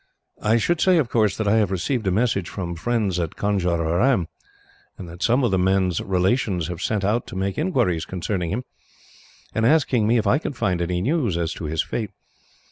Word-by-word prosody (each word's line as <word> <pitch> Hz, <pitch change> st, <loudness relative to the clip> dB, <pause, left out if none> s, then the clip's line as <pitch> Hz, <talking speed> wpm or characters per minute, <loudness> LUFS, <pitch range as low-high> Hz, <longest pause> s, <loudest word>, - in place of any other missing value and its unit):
I 110 Hz, +2 st, +3 dB
should 170 Hz, +8 st, 0 dB
say, 185 Hz, -2 st, +4 dB
of 140 Hz, -7 st, +1 dB
course, 110 Hz, -5 st, +1 dB
that 110 Hz, -, -1 dB
I 105 Hz, +2 st, +4 dB
have 105 Hz, -4 st, +2 dB
received 105 Hz, +4 st, -2 dB
a -, -, +3 dB
message 100 Hz, -3 st, 0 dB
from 85 Hz, -3 st, -4 dB
friends 100 Hz, 0 st, -1 dB
at 85 Hz, -2 st, -3 dB
Conjeveram; 90 Hz, +2 st, +1 dB, 0.7 s
that 85 Hz, -1 st, -10 dB
some 125 Hz, +6 st, +2 dB
of 120 Hz, -, +2 dB
the 95 Hz, -, +2 dB
man's 95 Hz, -2 st, +1 dB
relations 95 Hz, -1 st, 0 dB
have 90 Hz, 0 st, -5 dB
sent 105 Hz, -1 st, -1 dB
out 110 Hz, +4 st, 0 dB
to -, -, -8 dB
make 95 Hz, +1 st, -2 dB
inquiries 125 Hz, -, 0 dB
concerning 90 Hz, -1 st, -3 dB
him, 115 Hz, +8 st, -2 dB, 0.9 s
and 110 Hz, -, 0 dB
asking 125 Hz, -4 st, +3 dB
me 120 Hz, +2 st, +3 dB
if 110 Hz, -, 0 dB
I 120 Hz, +8 st, +3 dB
can 155 Hz, -, -4 dB
find 90 Hz, -7 st, -1 dB
any 90 Hz, +1 st, -1 dB
news 125 Hz, -, 0 dB
as 85 Hz, -1 st, -1 dB
to 85 Hz, -, -7 dB
his 75 Hz, +1 st, -1 dB
fate. 110 Hz, -3 st, -4 dB
100 Hz, 200 wpm, -23 LUFS, 90-120 Hz, 0.9 s, say